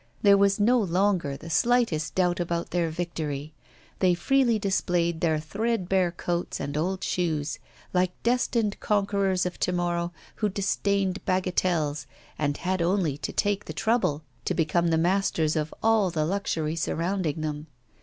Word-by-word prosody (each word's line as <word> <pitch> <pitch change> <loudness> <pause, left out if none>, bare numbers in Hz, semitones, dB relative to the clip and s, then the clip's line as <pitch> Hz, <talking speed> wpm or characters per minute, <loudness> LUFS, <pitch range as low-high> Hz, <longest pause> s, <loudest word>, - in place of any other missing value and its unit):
There 200 -1 +7
was 200 0 +3
no 240 +4 +4
longer 185 -6 +1
the 165 - -9
slightest 165 - +2
doubt 180 -1 +2
about 170 -1 -2
their 170 -1 +1
victory; 155 -3 -4 0.5
they 180 -2 +4
freely 250 +4 +2
displayed 175 -4 0
their 160 -2 +2
threadbare 190 0 0
coats 175 0 -3
and 140 - -4
old 185 +5 -1
shoes, 155 -4 -1 0.3
like 180 0 +2
destined 235 -3 +1
conquerors 200 -3 +1
of 180 - -4
to - - +1
morrow 175 -1 -1 0.3
who 210 - +1
disdained 195 -1 0
bagatelles, 175 -6 0 0.3
and 145 -1 0
had 185 0 -1
only 170 -4 +1
to - - -3
take 205 -1 0
the - - -6
trouble 220 -10 +1 0.2
to - - 0
become 170 +1 +1
the 165 -1 +2
masters 170 -2 +1
of 155 0 -1
all 220 -4 +4
the 155 -3 -1
luxury 165 -4 -1
surrounding 165 -1 -1
them. 150 0 -4
180 Hz, 150 wpm, -26 LUFS, 160-200 Hz, 0.5 s, There